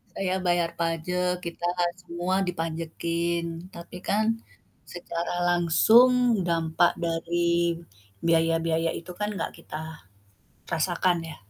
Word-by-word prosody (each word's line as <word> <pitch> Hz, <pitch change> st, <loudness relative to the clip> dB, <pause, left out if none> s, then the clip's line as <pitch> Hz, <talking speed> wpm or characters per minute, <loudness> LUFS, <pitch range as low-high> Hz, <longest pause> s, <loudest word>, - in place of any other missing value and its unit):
Saya 190 Hz, -1 st, 0 dB
bayar 175 Hz, -1 st, +1 dB
pajek, 180 Hz, +2 st, 0 dB
kita 170 Hz, 0 st, -3 dB, 0.4 s
semua 175 Hz, +2 st, -2 dB
dipajekin. 170 Hz, +1 st, -3 dB
Tapi 170 Hz, +1 st, -9 dB
kan, 215 Hz, +2 st, +1 dB, 0.6 s
secara 170 Hz, 0 st, -5 dB
langsung 225 Hz, +7 st, +5 dB
dampak 165 Hz, +1 st, +2 dB
dari 170 Hz, 0 st, 0 dB, 0.4 s
biaya-biaya 165 Hz, +1 st, +2 dB
itu 170 Hz, -, -10 dB
kan, 210 Hz, 0 st, -1 dB
nggak 190 Hz, -5 st, -3 dB
kita 155 Hz, -, -8 dB, 0.9 s
rasakan, 175 Hz, +1 st, +1 dB
ya. 160 Hz, -, -8 dB
170 Hz, 100 wpm, -26 LUFS, 165-180 Hz, 0.9 s, langsung